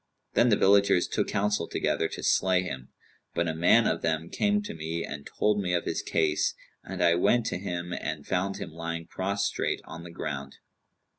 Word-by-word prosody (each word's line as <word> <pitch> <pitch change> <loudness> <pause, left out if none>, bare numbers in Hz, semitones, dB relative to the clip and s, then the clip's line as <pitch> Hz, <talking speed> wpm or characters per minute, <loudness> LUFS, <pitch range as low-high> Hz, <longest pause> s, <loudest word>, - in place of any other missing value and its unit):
Then 120 - +4
the 105 - +5
villagers 100 -2 +4
took - - -1
counsel 105 -3 0
together 80 - 0
to - - -7
slay 95 -1 +3
him; 65 -7 -6 0.5
but 85 +1 +1
a 80 - 0
man 90 +8 +5
of 80 - +1
them 80 0 -1
came 210 0 +1
to - - -6
me 80 +1 -3
and 70 0 -7
told 105 -1 +2
me 90 -2 0
of 85 - -1
his - - -1
case, - - +1 0.3
and - - -3
I 85 -1 +5
went 105 +7 +3
out - - 0
to - - -2
him 90 -2 -4
and 75 -4 -4
found 95 +1 -1
him - - -6
lying 85 +1 -4
prostrate 100 +4 -1
on 80 +1 -8
the 85 - -9
ground. 70 -4 -5
85 Hz, 200 wpm, -28 LUFS, 80-100 Hz, 0.5 s, the